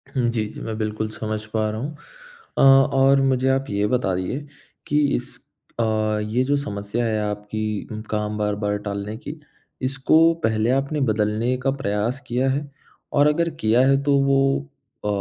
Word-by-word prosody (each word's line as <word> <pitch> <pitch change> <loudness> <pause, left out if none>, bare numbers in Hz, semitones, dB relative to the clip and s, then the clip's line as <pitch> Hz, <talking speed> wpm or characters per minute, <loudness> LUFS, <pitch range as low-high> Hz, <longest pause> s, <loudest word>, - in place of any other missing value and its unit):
हुँ। 125 -2 +2
जी, 115 -2 -1
जी। 105 - -9
मैं 110 -1 -4
बिल्कुल 110 0 -2
समझ 110 0 -4
पा 110 -1 +1
रहा 110 +1 -4
हूँ। 150 +3 -5 0.6
अ - - +3 0.3
और 135 +1 +5
मुझे 130 -1 +2
आप 135 +1 +1
ये 100 +1 0
बताइए 115 +3 -1 0.4
कि 150 - +2 0.2
इस 125 - -5 0.4
अ, - - +3 0.4
ये 110 +4 0
जो 145 +2 +2
समस्या 105 -2 -3
है 110 -1 0
आपकी 105 +1 -4
काम 105 0 -2
बार-बार 105 0 -1
टालने 100 +1 -4
की, 145 +5 -7 0.5
इसको 135 +5 +3
पहले 110 +1 +1
आपने 140 +3 0
बदलने 110 +3 +1
का 135 - +2
प्रयास 105 +6 -1
किया 125 +3 +1
है? 140 +2 -1 0.5
और 145 +1 +5
अगर 170 +3 +2
किया 110 +3 +4
है 135 0 +3
तो 140 -1 +3
वो 135 0 +3 0.7
अ, - - 0
115 Hz, 165 wpm, -23 LUFS, 105-135 Hz, 0.7 s, और